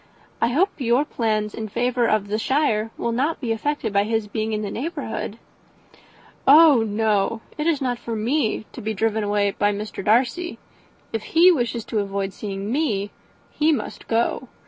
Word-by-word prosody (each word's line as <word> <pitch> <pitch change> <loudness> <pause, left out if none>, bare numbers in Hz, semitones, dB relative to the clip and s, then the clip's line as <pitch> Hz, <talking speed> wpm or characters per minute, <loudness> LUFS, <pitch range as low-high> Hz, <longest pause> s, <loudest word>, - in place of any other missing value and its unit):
I 230 - +4
hope 340 +12 +2
your 250 +2 +2
plans 215 -6 -1
in 220 - -5
favour 240 +2 0
of 215 -2 +1
the 210 +2 -1
shire 225 -5 +1
will 235 - -1
not 280 +8 0
be 240 -4 -2
affected 225 -1 -2
by 200 0 +3
his 220 -1 -1
being 220 +1 -2
in 215 0 -2
the 200 - -4
neighbourhood." 320 +8 -4 1.1
"Oh 295 -3 +8
no 215 0 0
it 300 +1 -2
is 315 -5 +1
not 245 -2 -1
for 230 - -5
me 225 0 0
to - - -9
be 220 +1 -3
driven 220 +1 0
away 205 -1 +1
by 205 +1 +1
Mr. 205 -1 -5
Darcy. 250 - +1 0.6
If 225 - -1 0.2
he 355 +2 +8
wishes 240 -7 -1
to 220 - -1
avoid 195 -1 -2
seeing 200 0 -5
me 220 -9 0 0.4
he 310 +1 +2
must 295 - -4
go. 235 +2 0
225 Hz, 175 wpm, -23 LUFS, 210-265 Hz, 1.1 s, Oh